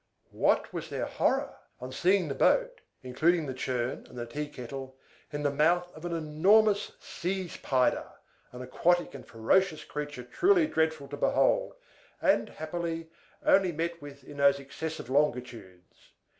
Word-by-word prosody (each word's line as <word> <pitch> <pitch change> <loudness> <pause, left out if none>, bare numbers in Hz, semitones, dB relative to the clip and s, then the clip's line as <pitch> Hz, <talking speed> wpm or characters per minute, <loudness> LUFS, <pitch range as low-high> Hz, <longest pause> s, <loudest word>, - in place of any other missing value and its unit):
What - - +1
was - - -5
their - - -2
horror - - 0 0.2
on 125 +1 -7
seeing 180 +5 +2
the 140 - -2
boat - - +2 0.2
(including 155 +6 +2
the 135 - -4
churn 125 -1 -3
and - - -13
the 120 - -3
tea 145 +5 -4
kettle) 130 0 -8 0.3
in 145 0 -4
the 145 - +2
mouth 175 +5 +2
of 155 - -10
an 175 - -3
enormous 190 +7 +3
Seeze 185 0 -4
Pyder, 130 -2 +1 0.4
an 125 0 -8
aquatic 175 +7 +1
and 135 -3 -9
ferocious 155 +10 +1
creature 145 -3 -6
truly 355 - +3
dreadful 160 - 0
to 145 - -6
behold, - - +2 0.4
and, - - +2
happily, 165 0 -5 0.3
only 190 -2 +5
met 170 +1 -3
with 140 -1 -11
in 145 +1 -11
those 140 0 +4
excessive 155 +1 -6
longitudes! 120 -10 -3
150 Hz, 150 wpm, -29 LUFS, 130-175 Hz, 0.4 s, only